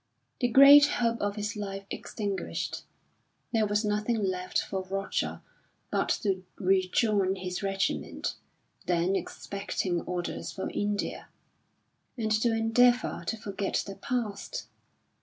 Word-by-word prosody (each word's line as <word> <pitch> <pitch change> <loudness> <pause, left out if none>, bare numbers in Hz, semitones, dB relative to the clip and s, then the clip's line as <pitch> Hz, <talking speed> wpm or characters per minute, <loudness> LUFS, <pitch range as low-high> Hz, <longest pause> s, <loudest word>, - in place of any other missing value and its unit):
The 245 - +2
great 280 +4 +9
hope 235 -5 0
of 205 0 -1
his 210 0 -3
life 195 -1 -5
extinguished, 200 -3 -3 0.7
there 220 -2 +3
was 210 +1 +1
nothing 210 +3 +1
left 185 -3 -1
for 190 - -1
Roger 195 +1 -2 0.5
but - - +1
to 190 -3 0
rejoin 190 +1 +2
his 180 -1 -4
regiment, 195 -1 -1 0.5
then 175 +2 +2
expecting 195 -3 -3
orders 175 -1 -3
for 190 - -4
India, 205 0 -2 0.9
and 220 -2 -1
to 220 +2 +3
endeavour 235 +2 +3
to 225 - -1
forget 200 -2 -2
the 195 - -6
past. 245 - -3
205 Hz, 120 wpm, -29 LUFS, 195-225 Hz, 0.9 s, great